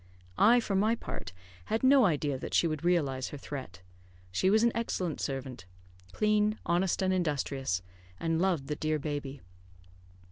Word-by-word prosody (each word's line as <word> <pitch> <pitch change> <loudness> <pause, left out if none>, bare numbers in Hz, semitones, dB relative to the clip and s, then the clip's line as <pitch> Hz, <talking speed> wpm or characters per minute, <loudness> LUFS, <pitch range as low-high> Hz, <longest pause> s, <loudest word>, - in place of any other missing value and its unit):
I, 235 +4 +6
for 220 -4 -3
my 215 +4 +3
part, - - -7 0.3
had 220 +3 -1
no 265 -1 +6
idea 145 -6 0
that - - -4
she - - +4
would 155 -2 -2
realise 145 -7 +1
her 145 - -7
threat. 130 -11 -8 0.5
She 185 - +2
was 215 +3 +4
an 235 - +4
excellent 185 -8 -2
servant, 130 -8 -5 0.4
clean, 210 - +2
honest, 180 +2 +1
and 185 0 +2
industrious, 140 - -1 0.4
and 165 0 0
loved 180 -7 +1
the 150 - -3
dear 155 +1 -1
baby. 145 -2 -5
165 Hz, 155 wpm, -30 LUFS, 140-205 Hz, 0.5 s, I